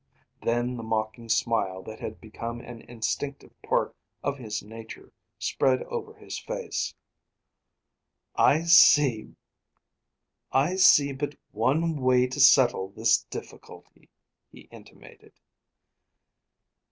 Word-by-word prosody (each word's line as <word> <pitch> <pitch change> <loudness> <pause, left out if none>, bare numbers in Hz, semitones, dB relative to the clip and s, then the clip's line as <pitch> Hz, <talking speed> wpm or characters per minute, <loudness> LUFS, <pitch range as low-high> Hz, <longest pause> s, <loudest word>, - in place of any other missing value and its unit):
Then 120 +1 -1
the - - -6
mocking 110 +1 -3
smile 110 -5 0
that 110 +2 -10
had 110 - -7
become 115 +2 -7
an 120 -1 -11
instinctive 130 +4 -4
part - - -1 0.3
of 140 -1 -2
his 110 -4 -5
nature 110 +1 -11 0.3
spread 130 -1 0
over 445 -2 -6
his - - -8
face. - - -4 1.4
"I 155 +3 +3
see 145 -8 +5 1.8
but 145 +2 -4 0.2
one 150 +9 0
way 125 0 +3
to 130 +3 -6
settle 125 -8 +5
this 115 +3 +2
difficulty," - - -12 0.4
he - - -14
intimated. - - -16
120 Hz, 100 wpm, -26 LUFS, 110-140 Hz, 1.8 s, see